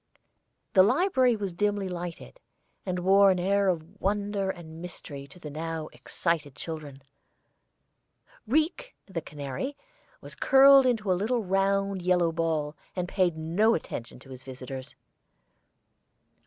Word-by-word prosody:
The 190 - +7
library 255 - +3
was 200 -4 -4
dimly 205 +1 0
lighted, 175 - -7 0.5
and 180 -1 -1
wore 195 +2 +5
an 185 - +3
air 195 +2 +2
of 180 +2 -3
wonder 200 -1 0
and 165 -3 -7
mystery 145 -5 -8
to 140 - -16
the 150 -4 -8
now 160 +1 -4
excited 155 -5 -2
children. 150 -4 -7 1.4
Rique, 315 - 0
the 185 -4 -5
canary, 145 - -5 0.4
was - - -11
curled 270 -1 +7
into 220 -6 +1
a - - +5
little 220 +6 0
round 195 0 +1
yellow 175 -2 +2
ball, 160 -2 -1 0.2
and 180 -1 -2
paid 180 -3 +1
no 175 +8 +2
attention 120 -7 -6
to 135 - -14
his 130 0 -10
visitors. 130 0 -8
180 Hz, 130 wpm, -28 LUFS, 160-205 Hz, 1.4 s, The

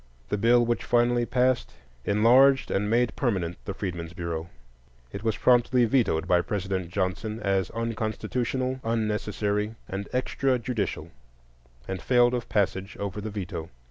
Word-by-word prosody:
The 105 - 0
bill 120 +2 +4
which 120 0 -1
finally 120 0 +2
passed 125 +1 +1 0.3
enlarged 125 +6 +5
and 105 +1 0
made 120 +1 +2
permanent 95 -9 -1
the 100 - -3
Freedmen's 85 -4 -5
Bureau. 85 -1 -4 0.6
It 100 - -6
was 110 -2 0
promptly 125 0 +4
vetoed 110 -9 +1
by 90 -1 +4
President 95 -2 -3
Johnson 100 +4 -2
as 95 -3 0
"unconstitutional," 115 +3 -2
"unnecessary," 105 -1 -1
and 100 +1 -5
"extrajudicial," 125 - -1 0.8
and 95 -2 -4
failed 120 -1 +4
of 120 -2 -3
passage 100 -2 -1
over 100 0 -4
the 110 - -4
veto. 90 -5 -5
110 Hz, 135 wpm, -26 LUFS, 95-120 Hz, 0.8 s, enlarged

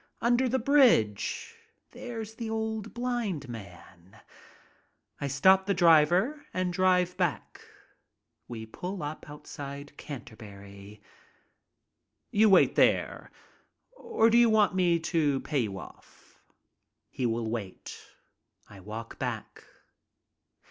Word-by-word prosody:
Under 240 +2 +2
the 260 - +1
bridge! 240 - +2 0.4
There's 225 -3 -7
the 225 0 -6
old 220 -1 -3
blind 235 - -3
man. 95 -5 -12 1.0
I 140 - -2
stop 190 +8 +4
the 200 - +1
driver 175 - +4
and 185 -1 -1
drive 180 -1 +2
back. 180 -5 -2 0.9
We 115 -2 -7
pull 180 - -6
up 150 +1 -7
outside 145 -1 -8
the - - -26
Canterbury. 105 -7 -11 1.3
"You 215 +1 +4
wait 190 - +5
there, - - +1 0.7
or 445 - +1
do 235 - +5
you 235 -1 +5
want 215 -3 +3
me 175 -2 +2
to 155 -4 +1
pay 150 -3 -1
you 105 -5 -2
off?" - - -15 0.7
He 125 - -1
will 115 0 -2
wait. 105 -6 -6 0.7
I 100 - -14
walk 110 +4 -8
back. - - -5
170 Hz, 115 wpm, -28 LUFS, -, 1.3 s, wait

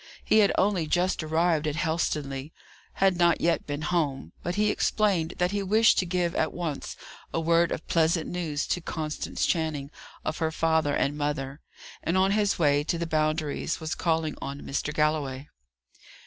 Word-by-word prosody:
He 220 - +5
had 205 -2 +5
only 190 -5 +2
just 180 +3 +1
arrived 160 0 +1
at 150 - -1
Helstonleigh; 155 -4 -1 0.4
had 190 -2 +2
not 170 -1 +4
yet 170 0 +1
been 145 +1 -3
home; 145 - -1
but 175 - -3
he 210 0 +2
explained 190 -7 +1
that 180 +1 +1
he 205 0 -1
wished 215 +3 +4
to 185 - 0
give 175 -1 0
at 160 - 0
once 165 -5 -4 0.4
a - - -1
word 170 +1 +3
of - - -4
pleasant 165 0 +2
news 160 -5 -2
to 175 - 0
Constance 155 -2 -3
Channing 155 -4 -1 0.3
of 155 - -2
her 160 -1 0
father 160 -2 +1
and 145 - 0
mother, 145 -1 -3 0.4
and, 170 +3 0
on 190 +1 +3
his 205 -1 +2
way 145 -3 +3
to 170 - -1
the 170 - -2
Boundaries, 155 0 -1
was 160 -1 -3
calling 160 -2 0
on 140 +1 -5
Mr. 145 +2 -3
Galloway. 150 -3 0
160 Hz, 175 wpm, -27 LUFS, 150-175 Hz, 0.4 s, He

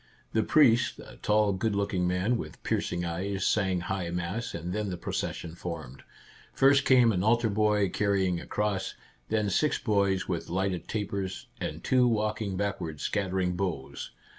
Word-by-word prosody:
The 110 - +3
priest, 125 -1 +4
a - - -12
tall, 105 -1 +2
good 100 +3 -1
looking 100 -3 0
man 90 +7 +1
with 75 -9 -6
piercing 85 0 -1
eyes, 95 +4 -2
sang 95 -4 +2
high 85 0 -3
mass, 90 +7 -3
and 85 +2 -4
then 105 -1 -1
the 90 - -4
procession 85 -1 -4
formed. 80 -7 -7 0.5
First 135 +1 +5
came 125 -3 +6
an 90 -4 0
altar 115 0 +3
boy 105 -1 +2
carrying 95 -3 +1
a - - -11
cross, 105 -2 -1 0.3
then 105 -2 +1
six 150 +10 +2
boys 100 -4 +1
with 85 -3 -3
lighted 95 -1 -1
tapers, 100 -3 -3
and - - -4
two 125 -1 +4
walking 105 -3 0
backward 95 -6 -3
scattering 95 -2 -1
boughs. 85 -8 -3
100 Hz, 160 wpm, -29 LUFS, 90-105 Hz, 0.5 s, came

